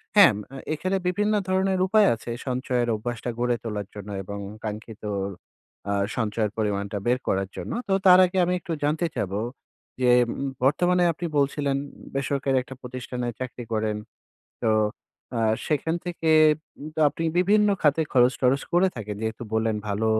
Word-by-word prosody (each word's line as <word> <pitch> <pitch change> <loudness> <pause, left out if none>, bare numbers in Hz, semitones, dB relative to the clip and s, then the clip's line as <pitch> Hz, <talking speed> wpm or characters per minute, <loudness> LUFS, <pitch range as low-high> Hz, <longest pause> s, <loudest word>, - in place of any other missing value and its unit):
হ্যাঁ, 200 -4 +9
ম - - -5 0.2
আ - - -6 0.2
এখানে 185 +5 -1
বিভিন্ন 210 +4 +1 0.2
ধরনের 190 0 +2
উপায় 210 0 +5
আছে 115 - -10 0.2
সঞ্চয়ের 125 -1 0
অভ্যাসটা 120 +2 -4
গড়ে 120 0 +2
তোলার 105 -3 -4
জন্য 105 0 -8
এবং 100 +2 -6 0.2
কাঙ্ক্ষিত 110 +1 -6 0.9
আ - - +1 0.2
সঞ্চয়ের 110 -2 0
পরিমাণটা 100 -1 -1
বের 125 +1 +3
করার 95 0 0
জন্য। - - -5 0.2
তো 195 - +1
তার 180 0 +9
আগে 185 +1 -3
আমি 180 - 0
একটু 170 - -8
জানতে 155 +4 +1
চাবো 100 -1 -2 0.6
যে 125 - +4 0.2
উম - - -3 0.3
বর্তমানে 175 +6 +3
আপনি 170 - -5
বলছিলেন 140 0 +1 0.4
বেসরকারি 135 -1 0
একটা 130 - -10
প্রতিষ্ঠানে 125 -1 -5
চাকরি 125 -1 -5
করেন। 110 -1 0 0.7
তো 110 - +3 0.7
আ - - +1 0.3
সেখান 160 +2 0
থেকে 170 -2 -2 0.5
উম 150 - -7
তো - - -3
আপনি 165 - -5
বিভিন্ন 210 +3 +4
খাতে 150 +1 +3
খরচ-টরচ 125 +1 +3
করে 180 +2 +5
থাকেন। 105 -2 -5
যেহেতু 110 +1 -3
বললেন 110 0 +1
ভালো 105 +2 -1
125 Hz, 155 wpm, -25 LUFS, 110-170 Hz, 0.9 s, হ্যাঁ